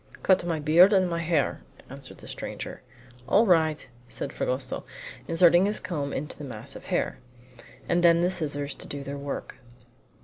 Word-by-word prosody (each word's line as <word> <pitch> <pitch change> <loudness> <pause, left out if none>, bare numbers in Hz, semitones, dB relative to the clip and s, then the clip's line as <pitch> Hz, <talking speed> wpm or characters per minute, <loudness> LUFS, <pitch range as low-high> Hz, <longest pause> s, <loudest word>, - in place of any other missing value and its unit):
"Cut 190 -2 +4
my 170 -2 -1
beard 170 +7 +6
and 190 -2 +4
my 170 -1 -2
hair," 165 - 0 0.3
answered - - -10
the - - -13
stranger. - - -6 0.5
"All 215 +4 +5
right!" 160 -5 +2 0.2
said 140 - -4
Fragoso, 130 0 -3 0.4
inserting 175 +2 +5
his 210 - +1
comb 150 -6 -3
into 150 +3 -5
the - - -7
mass 120 -6 -7
of - - -10
hair. - - -1 0.7
And 175 0 +1
then 170 0 +6
the 180 - +2
scissors 145 -5 -2
to - - -9
do 140 -1 -6
their 140 +1 -6
work. 140 0 -6
165 Hz, 170 wpm, -27 LUFS, 145-175 Hz, 0.7 s, beard